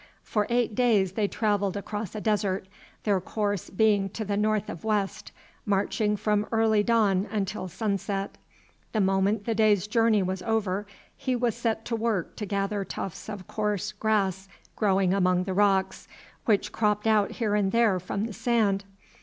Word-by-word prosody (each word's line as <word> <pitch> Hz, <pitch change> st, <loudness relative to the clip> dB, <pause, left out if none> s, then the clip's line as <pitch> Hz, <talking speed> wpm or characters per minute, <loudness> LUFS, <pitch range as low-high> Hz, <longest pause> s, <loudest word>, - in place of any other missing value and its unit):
For 210 Hz, -2 st, 0 dB
eight 240 Hz, -2 st, +1 dB
days 210 Hz, -6 st, +3 dB
they 205 Hz, +1 st, 0 dB
travelled 205 Hz, -2 st, 0 dB
across 205 Hz, 0 st, -5 dB
a 215 Hz, -, -4 dB
desert, 200 Hz, -3 st, 0 dB, 0.4 s
their 200 Hz, -3 st, +2 dB
course 205 Hz, 0 st, -2 dB
being 205 Hz, -1 st, +2 dB
to 215 Hz, +3 st, -5 dB
the 205 Hz, 0 st, -1 dB
north 215 Hz, 0 st, +1 dB
of 170 Hz, -, -7 dB
west, 210 Hz, -3 st, -1 dB, 0.3 s
marching 210 Hz, +1 st, 0 dB
from 210 Hz, 0 st, 0 dB
early 220 Hz, -2 st, +3 dB
dawn 205 Hz, -3 st, +2 dB
until 200 Hz, -2 st, -2 dB
sunset. 195 Hz, 0 st, -3 dB, 0.5 s
The 220 Hz, -, +1 dB
moment 195 Hz, +2 st, +2 dB
the 230 Hz, -, 0 dB
day's 215 Hz, -3 st, +3 dB
journey 220 Hz, -1 st, +3 dB
was 185 Hz, 0 st, -2 dB
over 205 Hz, -2 st, -1 dB, 0.3 s
he 260 Hz, -1 st, -1 dB
was 240 Hz, -2 st, +1 dB
set 225 Hz, -1 st, -2 dB
to 235 Hz, -, -1 dB
work 225 Hz, -6 st, -1 dB
to 210 Hz, -, -4 dB
gather 200 Hz, +1 st, -1 dB
tufts 195 Hz, +1 st, -6 dB
of 205 Hz, -4 st, -6 dB
coarse 210 Hz, -1 st, -2 dB
grass 195 Hz, -3 st, 0 dB, 0.3 s
growing 195 Hz, -3 st, +2 dB
among 185 Hz, -2 st, +2 dB
the 190 Hz, 0 st, -3 dB
rocks, 190 Hz, -1 st, +1 dB, 0.4 s
which 210 Hz, -3 st, +2 dB
cropped 210 Hz, -1 st, 0 dB
out 215 Hz, -2 st, +3 dB
here 220 Hz, -4 st, -1 dB
and 200 Hz, -2 st, +2 dB
there 225 Hz, -5 st, +3 dB
from 200 Hz, +4 st, -3 dB
the 230 Hz, -, -6 dB
sand. 210 Hz, -4 st, +1 dB
205 Hz, 165 wpm, -27 LUFS, 195-220 Hz, 0.5 s, days